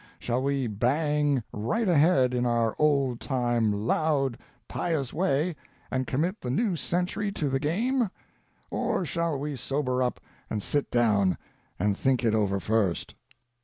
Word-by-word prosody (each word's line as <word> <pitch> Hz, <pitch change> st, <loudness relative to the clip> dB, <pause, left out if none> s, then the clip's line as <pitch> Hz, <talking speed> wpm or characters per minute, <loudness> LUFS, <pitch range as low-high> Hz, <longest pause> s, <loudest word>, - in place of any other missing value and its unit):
Shall 120 Hz, +1 st, -1 dB
we 140 Hz, -1 st, 0 dB
bang 140 Hz, +4 st, +1 dB
right 210 Hz, -, -1 dB
ahead 145 Hz, -6 st, +4 dB
in 125 Hz, 0 st, +1 dB
our 115 Hz, -2 st, +1 dB
old 140 Hz, -5 st, +2 dB
time, 120 Hz, -4 st, +1 dB
loud, 135 Hz, +5 st, 0 dB, 0.3 s
pious 155 Hz, -7 st, -2 dB
way, 165 Hz, -1 st, +1 dB, 0.4 s
and 130 Hz, 0 st, -1 dB
commit 170 Hz, +10 st, -1 dB
the 125 Hz, -, -4 dB
new 185 Hz, -, +1 dB
century 180 Hz, +5 st, -1 dB
to 150 Hz, -7 st, -1 dB
the 135 Hz, 0 st, 0 dB
game; 225 Hz, -, +1 dB, 0.6 s
or 180 Hz, -, 0 dB
shall 170 Hz, -2 st, -1 dB
we 145 Hz, +1 st, -3 dB
sober 130 Hz, 0 st, -1 dB
up 125 Hz, -1 st, 0 dB, 0.3 s
and 105 Hz, -2 st, -2 dB
sit 145 Hz, -1 st, 0 dB
down 105 Hz, -6 st, +3 dB, 0.4 s
and 100 Hz, +2 st, +1 dB
think 130 Hz, +3 st, +1 dB
it 115 Hz, -2 st, +3 dB
over 100 Hz, -3 st, +1 dB
first? 100 Hz, -2 st, 0 dB
135 Hz, 145 wpm, -27 LUFS, 120-155 Hz, 0.6 s, ahead